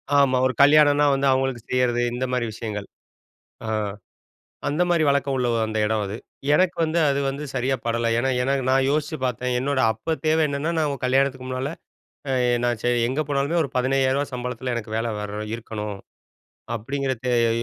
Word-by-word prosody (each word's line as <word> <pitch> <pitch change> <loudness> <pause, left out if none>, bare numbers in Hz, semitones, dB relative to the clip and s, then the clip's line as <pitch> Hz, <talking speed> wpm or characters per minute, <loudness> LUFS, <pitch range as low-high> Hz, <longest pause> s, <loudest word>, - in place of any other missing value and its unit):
ஆமா. 135 -2 +4
ஒரு 130 - +1
கல்யாணம்னா 145 0 +6
வந்து 135 0 +1
அவங்களுக்கு 130 -2 0
செய்யிறது 125 -1 +2
இந்த 130 +1 -2
மாரி 125 -2 0
விஷயங்கள். 105 -3 -5 0.8
ஆ - - -5 1.0
அந்த 150 +5 +1
மாரி 165 -3 +3
வழக்கம் 140 -1 +1
உள்ள 125 -1 0 0.2
அந்த 110 0 -3
இடம் 110 -1 0
அது. 100 +3 -5 0.4
எனக்கு 180 +1 +2
வந்து 160 +2 0
அது 140 0 0
வந்து 145 +2 -5
சரியா 130 +1 0
படல. 115 0 0
ஏன்னா 130 +2 +1
எனக்கு 135 +1 0
நான் 135 0 +3
யோசிச்சு 155 +2 -1
பாத்தேன். 125 0 -1
என்னோட 135 +1 0
அப்ப 155 +9 -3
தேவை 160 +1 +3
என்னன்னா, 140 +4 -2
நான் 155 -2 +1
உங்க 140 - -5
கல்யாணத்துக்கு 130 0 +1
முன்னால 130 +4 -3 0.9
நான் 120 0 +2 0.3
எங்க 135 +4 -1
போனாலுமே, 145 +4 0
ஒரு 140 - -3
15,000 135 +2 +1
சம்பளத்தில 125 0 -4
எனக்கு 110 -2 -5
வேலை 115 +1 -1
வர 105 0 -5
இருக்கணும். 105 -3 -5 0.8
அப்படிங்குறது 130 +1 -3 0.2
எ - - +1
130 Hz, 165 wpm, -23 LUFS, 120-140 Hz, 1.0 s, கல்யாணம்னா